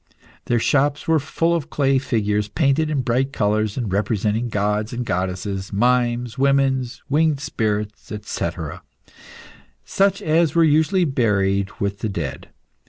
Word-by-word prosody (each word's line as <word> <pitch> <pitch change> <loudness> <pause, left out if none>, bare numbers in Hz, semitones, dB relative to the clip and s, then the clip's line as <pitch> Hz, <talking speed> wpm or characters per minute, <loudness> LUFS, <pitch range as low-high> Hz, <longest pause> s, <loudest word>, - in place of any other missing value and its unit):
Their 120 - +1
shops 145 +5 +1
were 160 -1 +4
full 165 +4 0
of 160 -5 -3
clay 135 -2 +2
figures 105 -5 0
painted 140 +7 +1
in 145 -4 0
bright 130 +3 0
colours 105 -2 0
and 115 -7 -2
representing 105 +3 0
gods 105 +1 -1
and 120 0 -3
goddesses, 95 +1 -3
mimes, 120 +2 +1
women, 135 -1 +3 0.2
winged 150 0 +2
sprites, 105 -6 -3
&c., 85 - -2 1.4
such 195 - +1
as 160 0 +2
were 165 - +5
usually 160 +4 +3
buried 100 -7 +1
with 100 0 -2
the 110 - -2
dead. 80 -9 -5
120 Hz, 135 wpm, -21 LUFS, 105-140 Hz, 1.4 s, were